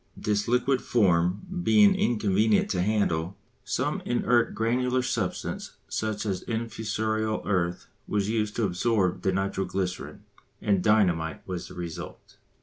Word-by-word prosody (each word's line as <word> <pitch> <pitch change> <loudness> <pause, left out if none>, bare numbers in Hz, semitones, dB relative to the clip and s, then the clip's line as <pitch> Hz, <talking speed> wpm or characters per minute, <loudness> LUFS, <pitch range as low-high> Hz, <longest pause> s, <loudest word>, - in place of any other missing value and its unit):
This 105 -1 0
liquid 125 +2 +2
form 90 - +2 0.2
being 205 +2 +6
inconvenient 110 - +2
to 90 - 0
handle, 95 -4 0 0.3
some - - -1
inert 120 -1 +1
granular 125 +3 +1
substance - - -3 0.2
such 110 -1 -2
as 95 -3 -2
infusorial 110 -1 -2
earth 90 -3 0 0.2
was 100 -1 0
used 105 -1 -1
to 115 - 0
absorb 95 0 +1
the 95 - +1
nitro 95 +1 -1
glycerine, 95 -2 -4 0.4
and 100 -3 +1
dynamite 90 -7 +2
was 90 -2 -4
the - - -11
result. 85 -2 -8
105 Hz, 130 wpm, -27 LUFS, 95-115 Hz, 0.4 s, being